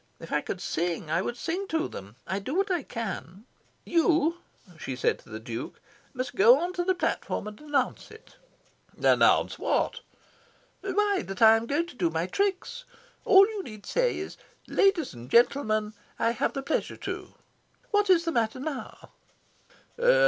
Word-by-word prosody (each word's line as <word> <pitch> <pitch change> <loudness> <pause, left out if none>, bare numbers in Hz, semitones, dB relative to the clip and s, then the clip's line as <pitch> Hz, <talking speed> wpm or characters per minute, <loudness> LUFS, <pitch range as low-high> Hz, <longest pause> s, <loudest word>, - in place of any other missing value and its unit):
If - - -8
I - - +2
could - - -5
sing, 165 -2 -2
I 165 +2 +2
would 240 +5 -4
sing 365 +7 -3
to 320 -2 0
them. 100 +3 -10
I 190 +3 -2
do 255 +10 -4
what 390 +1 +1
I 350 -3 +1
can. 215 -5 -6 0.4
You," 335 0 +2 0.4
she 130 - -4
said 125 - 0
to - - -19
the 110 0 -6
Duke, 115 +2 -6 0.4
"must 255 0 -3
go 230 +6 +7
on 350 +3 -2
to 355 - -1
the 375 +1 +1
platform 350 - -2
and 210 +3 -9
announce 290 -4 -1
it." 440 - -16 0.6
"Announce - - +3
what?" - - 0 0.8
"Why, 400 0 +1
that 195 +4 -2
I 220 0 +9
am 225 +1 -2
going 295 +6 +1
to 340 - -13
do 175 -7 +1
my 165 +1 -1
tricks! 400 - -2 0.4
All 390 +1 +8
you 430 -2 -4
need 215 - -10
say - - +1
is - - -6 0.3
'Ladies 390 -5 +2
and 120 0 -11
gentlemen, 215 - +3 0.2
I 230 - +2
have 235 - -1
the 275 - -4
pleasure 315 - -2
to - - -6 0.2
' - - -37
What 415 -1 +2
is 345 -2 +5
the 330 - 0
matter 230 -1 0
now?" 275 -1 -6
270 Hz, 175 wpm, -27 LUFS, -, 0.8 s, I